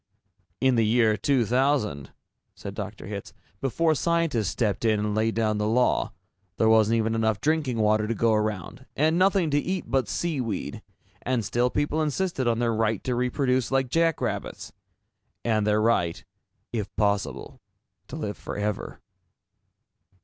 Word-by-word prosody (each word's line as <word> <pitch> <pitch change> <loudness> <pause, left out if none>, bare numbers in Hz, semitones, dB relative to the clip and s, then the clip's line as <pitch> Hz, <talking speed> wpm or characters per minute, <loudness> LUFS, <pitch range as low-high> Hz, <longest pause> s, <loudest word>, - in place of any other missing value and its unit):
"In 130 +1 +3
the 115 - +4
year 110 0 +3
2000," 125 - +1 0.5
said - - -7
Dr. - - -6
Hitz, - - -7 0.3
"before 160 +5 +1
scientists 165 - 0
stepped 105 -1 -1
in 110 -2 +2
and 105 0 -1
laid 110 +1 0
down 110 -2 +1
the 105 - 0
law, 125 +3 +2 0.5
there 110 - +3
wasn't 110 0 +4
even 110 0 0
enough 110 -2 +1
drinking 145 -3 0
water 105 0 +2
to 115 - -1
go 115 +1 +2
around, 105 -4 -2
and 160 +4 +2
nothing 185 -4 +3
to 145 - +3
eat 185 +4 -2
but 130 -5 +1
sea 165 -6 -1
weed 110 -6 -4 0.4
and 125 -3 -1
still 120 +4 +1
people 145 +4 0
insisted 155 -3 -1
on 115 -1 +2
their 115 -1 +1
right 110 -2 0
to 125 - -1
reproduce 125 0 0
like 135 -1 +1
jackrabbits. 165 +2 -1 0.7
And 110 -2 +1
their 105 0 +3
right, 110 -7 +1 0.5
if 105 -3 -4
possible, 100 - -1 0.5
to - - -8
live - - -4
forever." 105 -1 -4
115 Hz, 150 wpm, -26 LUFS, 110-135 Hz, 0.7 s, the